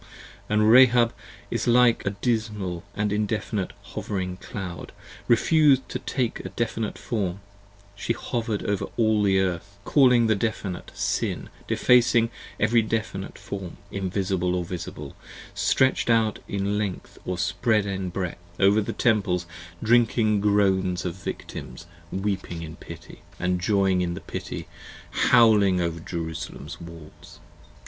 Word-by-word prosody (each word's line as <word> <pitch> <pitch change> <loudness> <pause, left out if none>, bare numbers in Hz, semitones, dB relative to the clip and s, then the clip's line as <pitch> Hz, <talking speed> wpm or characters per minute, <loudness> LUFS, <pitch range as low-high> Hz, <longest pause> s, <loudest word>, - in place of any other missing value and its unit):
And 105 0 +3
Rahab 120 -1 +6 0.5
like 120 -1 +5
a - - +4
dismal 105 -4 -2
and 105 0 0
indefinite 105 -1 -1
hovering 90 -3 -4
Cloud 95 -3 -7 0.3
Refus'd 140 +2 +4
to - - -3
take 125 -4 -2
a - - -6
definite 115 -2 -2
form, 100 -5 -2 0.6
she 100 +3 -1
hover'd 115 -3 -3
over 100 -2 -1
all 110 -2 +3
the 95 -2 +3
Earth 95 +1 -2
Calling 125 -5 +5
the 110 - +3
definite, 100 -4 -3
sin, - - -2 0.2
defacing 120 -1 +4 0.3
every 115 +2 +4
definite 110 -3 -3
form: 95 -3 -7
Invisible 95 -2 -1
or 90 -1 -1
Visible, 85 0 -7 0.4
stretch'd 130 -2 +2
out 115 -2 +3
in 100 +1 -1
length 100 -4 -5
or 90 - -3
spread 105 +3 +1
in 95 -2 -3
breadth 90 -1 -4
55 95 - +1
Over 105 +2 +3
the 100 - -3
Temples, 100 -7 +1 0.4
drinking 115 -2 +3
groans 95 -3 +2
of 90 - -2
victims 85 -5 -7 0.3
weeping 95 -4 -3
in 80 0 -8
pity, - - -11 0.2
And 90 0 0
joying 95 -2 +2
in 85 -1 -1
the 95 - -7
pity, - - -6 0.4
howling 105 -5 +5
over 85 -1 -1
Jerusalem's 80 -1 -6
walls. 85 -2 -12
100 Hz, 130 wpm, -25 LUFS, 90-115 Hz, 0.6 s, Rahab